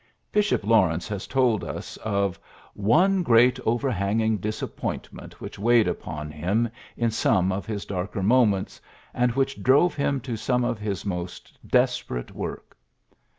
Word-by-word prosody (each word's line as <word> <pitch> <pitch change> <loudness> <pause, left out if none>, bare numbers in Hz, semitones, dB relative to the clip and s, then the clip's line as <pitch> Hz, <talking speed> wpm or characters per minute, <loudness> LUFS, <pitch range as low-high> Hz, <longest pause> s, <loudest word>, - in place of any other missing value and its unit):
Bishop 210 - +1
Lawrence 95 -7 +3
has 100 -1 -4
told, 125 -5 +2
us - - -6
of 100 -3 -1 0.4
'^one 180 - +3
great 120 -1 +5
overhanging 110 -2 +1
disappointment 105 +3 -5
which - - -8
weighed 115 +1 +4
upon 75 -1 -4
him 95 +10 0 0.3
in 115 -1 +1
some 95 -4 +2
of 95 +2 -4
his 105 -2 -4
darker 95 0 -3
moments, 105 -3 +2 0.3
and 125 0 +2
which 135 +1 -1
drove 145 +7 +4
him 140 -1 0
to 120 -2 -4
some 125 +2 0
of 120 -2 -1
his 105 -3 -4
most 90 -2 -5
desperate - - 0
work." - - -7
110 Hz, 140 wpm, -25 LUFS, 100-125 Hz, 0.4 s, great